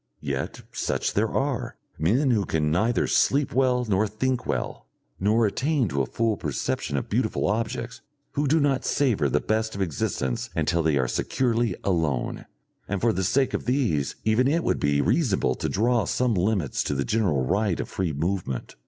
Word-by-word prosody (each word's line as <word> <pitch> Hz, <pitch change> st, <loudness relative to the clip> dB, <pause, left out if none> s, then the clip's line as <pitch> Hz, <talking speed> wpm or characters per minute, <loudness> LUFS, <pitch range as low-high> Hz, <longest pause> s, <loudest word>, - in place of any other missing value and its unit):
Yet -, -, -3 dB
such -, -, -1 dB
there 110 Hz, +2 st, +1 dB
are, 135 Hz, 0 st, -2 dB, 0.2 s
men 120 Hz, -, +2 dB
who 110 Hz, -4 st, +2 dB
can 75 Hz, -4 st, 0 dB
neither 110 Hz, +8 st, +2 dB
sleep 140 Hz, 0 st, +2 dB
well 125 Hz, -1 st, +2 dB
nor 105 Hz, +1 st, +2 dB
think 125 Hz, +5 st, -2 dB
well, -, -, -3 dB, 0.3 s
nor 110 Hz, +4 st, +3 dB
attain 135 Hz, +4 st, +1 dB
to 70 Hz, -2 st, 0 dB
a 65 Hz, -, -1 dB
full 115 Hz, -2 st, 0 dB
perception 70 Hz, -1 st, -2 dB
of 65 Hz, -, -3 dB
beautiful -, -, 0 dB
objects, 115 Hz, +3 st, -2 dB, 0.3 s
who 145 Hz, 0 st, 0 dB
do 160 Hz, +4 st, +3 dB
not 140 Hz, -3 st, +1 dB
savour 110 Hz, -, +1 dB
the -, -, +2 dB
best 110 Hz, 0 st, -1 dB
of 100 Hz, -, -3 dB
existence 65 Hz, -6 st, -2 dB
until 85 Hz, +1 st, +1 dB
they 80 Hz, -3 st, +2 dB
are 65 Hz, -2 st, +1 dB
securely 120 Hz, -, 0 dB
alone, 80 Hz, -9 st, -1 dB, 0.4 s
and 100 Hz, -, -2 dB
for 115 Hz, +1 st, +2 dB
the 95 Hz, -, -1 dB
sake 130 Hz, +8 st, +2 dB
of -, -, -2 dB
these 120 Hz, -, 0 dB
even 110 Hz, +4 st, +3 dB
it 165 Hz, +4 st, +1 dB
would -, -, 0 dB
be 70 Hz, 0 st, +2 dB
reasonable 105 Hz, -, +1 dB
to -, -, -3 dB
draw 115 Hz, +2 st, +2 dB
some 125 Hz, -2 st, +1 dB
limits 95 Hz, -, 0 dB
to 70 Hz, -, -1 dB
the 70 Hz, 0 st, -1 dB
general 90 Hz, -12 st, +1 dB
right 100 Hz, +5 st, 0 dB
of -, -, -3 dB
free 95 Hz, -4 st, -2 dB
movement. 80 Hz, -3 st, -3 dB
105 Hz, 180 wpm, -25 LUFS, 80-125 Hz, 0.4 s, nor